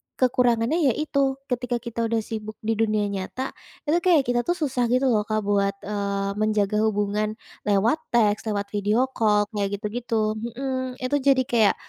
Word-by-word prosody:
kekurangannya 245 +3 +2
ya 270 -7 +3
itu, 280 -3 0 0.2
ketika 245 0 -1
kita 230 -1 -2
udah 225 -1 0
sibuk 215 -1 -6
di 225 - 0
dunia 215 -2 +2
nyata, 200 +7 -4 0.3
itu 320 +3 +2
kayak 340 -5 +4
kita 240 +2 0
tuh 350 - +2
susah 260 -7 0
gitu 255 +1 +2
loh 210 -1 +1
Kak 215 -1 0
buat, 200 -1 +1
eee, 200 -1 -2
menjaga 215 -1 +1
hubungan 210 +1 -1 0.3
lewat 210 +9 +3 0.2
teks, 215 -1 +2
lewat 200 -1 -2
video 215 +6 +1
call, 210 -4 +3
kayak 200 -1 -1
gitu-gitu. 215 0 -2 0.2
Hmm, 260 -1 -3
itu 285 +3 +1
jadi 265 -1 +3
kayak, 225 -4 +3
225 Hz, 165 wpm, -24 LUFS, 210-255 Hz, 0.3 s, kayak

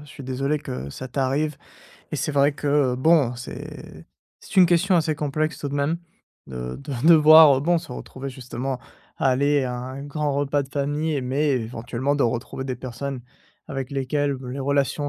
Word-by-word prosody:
je - - -16
suis 140 -1 -10
désolé 135 +3 -1
que 65 - -6
ça 130 - -7
t'arrive 140 +3 -1 0.5
et - - -1
c'est 150 +2 -2
vrai 140 +1 +3
que 145 -3 +1
bon 135 -2 +3
c'est 120 - -9 0.4
c'est - - -11
une 180 -2 +8
question 180 +3 +3
assez 155 -2 +2
complexe 155 +2 -2
tout 145 - -4
de - - -4
même 145 +4 0 0.5
de 60 -1 -6
de 140 0 -4
devoir 155 -3 +8
bon 170 +1 +3
se 160 -5 -11
retrouver 130 +2 -7
justement 130 0 -5 0.4
à 135 - +2
aller 140 +2 +2
à 125 - -3
un 130 +2 -6
grand 145 -1 -2
repas 145 0 +1
de 135 - -11
famille, 145 +1 -1
mais 140 +4 0
éventuellement 120 +3 -2
de 145 - +1
retrouver 120 +2 -3
des 130 -2 -3
personnes 130 +1 -5 0.5
avec 135 -1 -4
lesquelles 140 +1 -1
les 135 - -5
relations 140 +1 0
140 Hz, 180 wpm, -23 LUFS, 130-150 Hz, 0.5 s, une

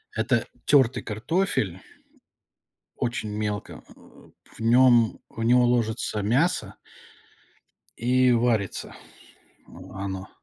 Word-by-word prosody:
Это 115 +1 0 0.2
тёртый 130 -4 +3
картофель. 110 - -2 1.2
Очень 120 -3 -3
мелко. 105 -1 -5
Э, - - -19 0.7
в - - -17
нём 120 0 +4
в 115 - -6
него 125 +2 +4
ложится 110 -3 -1
мясо. 135 - 0 1.2
И 125 +1 +3
варится 115 -5 0 1.0
оно. 95 0 -6
115 Hz, 85 wpm, -25 LUFS, 105-125 Hz, 1.2 s, нём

